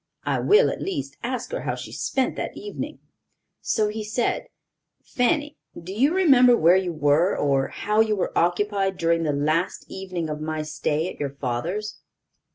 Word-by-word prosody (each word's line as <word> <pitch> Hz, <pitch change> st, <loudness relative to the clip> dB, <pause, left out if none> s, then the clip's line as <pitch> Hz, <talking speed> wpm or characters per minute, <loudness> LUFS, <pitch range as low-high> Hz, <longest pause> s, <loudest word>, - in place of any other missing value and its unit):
I -, -, 0 dB
will, 430 Hz, +4 st, +4 dB
at -, -, -6 dB
least, 295 Hz, -8 st, -4 dB
ask 250 Hz, 0 st, -4 dB
her -, -, -3 dB
how -, -, -2 dB
she -, -, -8 dB
spent 265 Hz, -1 st, -1 dB
that -, -, -5 dB
evening," 415 Hz, -, -6 dB, 0.6 s
so 215 Hz, -1 st, +1 dB
he 215 Hz, +1 st, -4 dB
said: 235 Hz, -, -1 dB, 0.6 s
"Fanny, 295 Hz, +3 st, 0 dB, 0.2 s
do 180 Hz, +3 st, -8 dB
you 265 Hz, +9 st, +3 dB
remember 260 Hz, -10 st, +6 dB
where 170 Hz, +3 st, +5 dB
you 185 Hz, -2 st, +1 dB
were, 155 Hz, +4 st, +2 dB
or 140 Hz, -2 st, +1 dB
how 210 Hz, +1 st, -1 dB
you 220 Hz, -1 st, +3 dB
were 190 Hz, -, -2 dB
occupied 195 Hz, +2 st, +1 dB
during 165 Hz, 0 st, +1 dB
the 155 Hz, -2 st, 0 dB
last 155 Hz, +5 st, 0 dB
evening 185 Hz, -4 st, -4 dB
of 150 Hz, 0 st, -5 dB
my 155 Hz, 0 st, -3 dB
stay 155 Hz, +1 st, -1 dB
at -, -, -8 dB
your 140 Hz, -1 st, -3 dB
father's?" 165 Hz, -, -3 dB
190 Hz, 170 wpm, -24 LUFS, 155-245 Hz, 0.6 s, remember